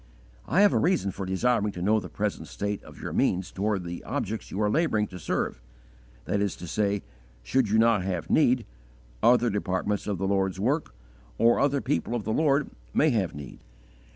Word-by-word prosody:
I 180 +8 +3
have 205 - +6
a - - +3
reason 175 - +1
for 95 0 -6
desiring 105 +2 +1
to 90 - -6
know 110 +3 +3
the 90 -3 -8
present 75 - -3
state 100 0 -4
of - - -14
your - - -5
means 95 0 +1
towards 100 -2 -1
the 85 0 -6
objects 110 +2 -3
you 95 - -5
are 105 - +2
labouring 110 -4 +2
to 90 - -9
serve: - - -2 0.6
viz., 100 +1 -1 0.4
should 125 - +1
you 110 - +3
not 115 -2 +4
have 90 -4 -3
need, 125 -5 +3 0.6
other 120 -1 +4
departments 100 0 -1
of 100 -2 -1
the 95 +2 -1
Lord's 95 -1 0
work, 130 - -1 0.4
or 115 +1 +4
other 140 0 +2
people 130 -3 -1
of 115 - -2
the 110 - -1
Lord, 145 -1 +2 0.2
may 155 - +4
have 100 - 0
need. 70 -3 -9
105 Hz, 180 wpm, -27 LUFS, 95-120 Hz, 0.6 s, have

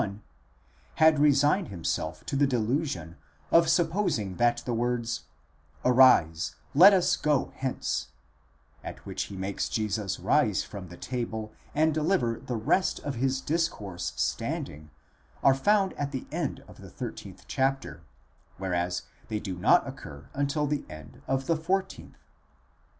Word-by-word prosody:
1, 100 0 -5 0.7
had 160 -2 +5
resigned 150 +5 +4
himself 85 -2 -3
to 140 - -3
the 140 +1 +3
delusion 120 - -1 0.3
of 165 -1 +5
supposing 165 - +1
that 120 0 +3
the 125 - -1
words 120 0 -1 0.6
Arise, 120 -11 +5 0.2
let 180 +8 +9
us 185 -2 +3
go 150 -5 0
hence, 130 -1 -2 0.8
at - - -8
which - - -3
he 100 - -9
makes 95 +1 -2
Jesus 105 -2 -2
rise - - +2
from 95 -4 -9
table 110 +3 -5 0.2
and 155 +1 +3
deliver 145 -8 +1
the 125 -1 -5
rest 180 - +1
of 145 - -3
his 130 +2 0
discourse 105 - -2
standing, 75 +1 -3 0.5
are 135 - +7
found 195 +7 +2
at 145 -1 -3
the 130 -2 -4
end - - -3
of - - -14
the - - -11
13th - - -8
chapter, 135 +1 -1 0.6
whereas 90 -1 -1 0.2
they 110 -1 -2
do 95 -3 -5
not 90 - +4
occur 70 -1 -9
until 145 +2 0
the 145 0 -1
end 75 -2 -11
of 135 0 0
the 165 - +2
r4th. 190 +4 -2
130 Hz, 140 wpm, -28 LUFS, 100-150 Hz, 0.8 s, let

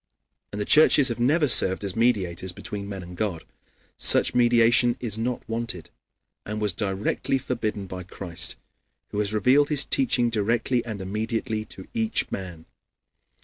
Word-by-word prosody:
And 105 - -6
the 105 - -2
churches 150 -1 +6
have 115 - -4
never 150 +6 +2
served 95 -6 +3
as 95 -2 -2
mediators 95 -7 0
between 100 +3 -7
men 95 -2 -6
and 90 0 -11
God. 90 -4 -3 0.5
Such - - +5
mediation 120 0 +3
is 115 -5 -2
not 120 +2 -4
wanted, 115 -7 -4 0.5
and 105 +1 -5
was 105 -3 -1
directly 100 +7 -2
forbidden 115 -6 -4
by 95 -1 -7
Christ, 85 -2 -2 0.5
who 105 - -4
has 105 -1 0
revealed 130 +7 +3
his 145 -2 +3
teaching 125 - +1
directly 115 +3 0
and 110 -4 -6
immediately 110 +2 -3
to - - -11
each 225 -1 -1
man. 85 -4 -7
110 Hz, 150 wpm, -24 LUFS, 95-120 Hz, 0.5 s, churches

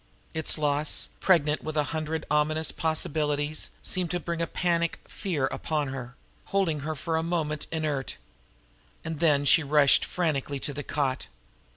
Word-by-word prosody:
Its 160 0 0
loss, 150 0 +1
pregnant 155 -5 +3
with 155 0 -4
a 150 - +4
hundred 160 0 -2
ominous 155 +1 +2
possibilities, 150 -1 0
seemed 180 -2 -1
to 175 - -1
bring 170 -1 -3
a 165 - 0
panic 170 -1 0
fear 170 -10 -2
upon 150 -3 -1
her, 125 -2 -6 0.3
holding 185 -6 +1
her 155 +3 -3
for 160 +2 -1
a - - +1
moment 160 -3 -2
inert 150 -4 -2 0.9
and 160 -2 -4
then 150 -4 +3
she 150 - +6
rushed 145 -1 +5
frantically 145 -5 -1
to 145 - -3
the 145 - -4
cot. 135 -3 -1
155 Hz, 155 wpm, -27 LUFS, 145-165 Hz, 0.9 s, she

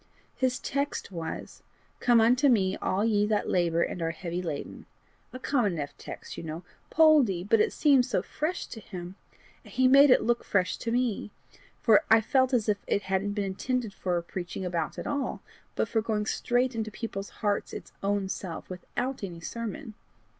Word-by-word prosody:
His 255 -1 +1
text 280 -5 -3
was: 165 -3 -6 0.4
Come 240 -2 +5
unto 250 +5 +4
me 195 -6 +3
all 200 +3 0
ye 210 -2 +2
that 210 -1 0
labour 170 -2 +2
and 180 - -4
are 165 - 0
heavy 170 +1 -4
laden; 160 -5 -6 0.4
a - - -7
common 250 -6 +1
enough 145 -4 -4
text, - - -9
you - - -6
know? 160 +2 -6 0.3
Poldie! 290 - +5
but 225 +1 +4
somehow - - +4
it - - -8
seemed 255 - +3
fresh 315 +4 -3
to 225 - -9
him, 180 -3 -8 0.5
and - - -14
he 260 0 +4
made 275 +2 +7
it 255 - +5
look 240 +1 +1
fresh 185 -2 +1
to 230 - -3
me, 240 -4 0 0.5
for 220 -3 +6
I 225 - +7
felt 260 +3 +2
as 235 -4 +1
if 205 -1 +1
it 200 - +1
hadn't 195 +2 -1
been 205 -1 -1
intended 225 +3 -2
for 180 -2 -1
preaching 180 +1 -5
about 170 -3 -2
at - - -5
all, 285 -1 -2 0.3
but - - 0
for 225 - +1
going 215 -1 -1
straight 245 +3 +1
into 220 -1 -3
people's 210 -3 -5 0.2
hearts 205 -1 0
its - - -8
own 200 0 0
self, 185 -2 -6
without 250 +8 -4
any 175 -4 -5
sermon. 230 - -6
210 Hz, 185 wpm, -28 LUFS, 185-250 Hz, 0.5 s, made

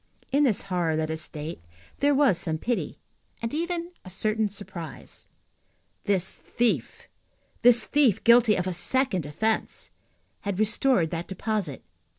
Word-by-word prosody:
In 285 +2 +4
this 215 -6 +1
horror, 175 -4 0
let 155 0 -1
us 160 0 -2
state, 155 - -5 0.4
there 285 0 +3
was 265 - +4
some 160 -2 -1
pity, 240 +8 -2 0.4
and 230 +3 -4
even 340 +2 -2
a 185 - -10
certain 215 +3 0
surprise. 185 -5 -8 0.8
This 190 -2 +1
thief, 240 -1 -2 0.5
this 240 -2 +6
thief 275 -7 +2
guilty 235 -2 +6
of 180 - -1
a 185 - -2
second 190 - +1
offence, 220 +9 -2 0.5
had 200 -2 -3
restored 215 -4 +2
that 170 0 -4
deposit. 190 - -3
205 Hz, 140 wpm, -26 LUFS, 175-245 Hz, 0.8 s, this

